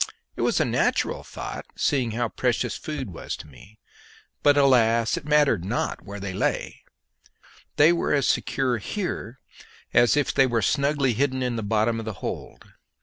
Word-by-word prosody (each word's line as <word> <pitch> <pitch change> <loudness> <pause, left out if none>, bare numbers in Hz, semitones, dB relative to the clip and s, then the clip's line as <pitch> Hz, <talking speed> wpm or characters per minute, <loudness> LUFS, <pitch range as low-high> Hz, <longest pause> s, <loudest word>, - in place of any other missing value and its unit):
It - - -4
was - - +2
a - - +3
natural - - 0
thought, - - -7
seeing 130 -5 +1
how 120 0 -1
precious 120 0 -1
food 140 -9 -5
was - - -5
to - - -11
me. 85 +10 -17 0.6
But, 145 0 +4
alas! 115 -4 +4
it - - -6
mattered 145 - +3
not 105 +6 -2
where 100 0 -8
they 100 -1 -5
lay; - - -2 0.9
they 155 +4 +6
were 170 - -1
as 140 -3 +2
secure 125 -3 0
here 135 - -4 0.5
as 120 +4 +4
if 145 - +1
they 135 -1 +4
were 115 -3 0
snugly 140 -3 +1
hidden 130 +2 0
in 125 -1 -1
the 115 - -2
bottom 110 +2 +1
of 115 - -6
the 110 - -4
hold. 90 - -7
120 Hz, 170 wpm, -25 LUFS, 110-140 Hz, 0.9 s, they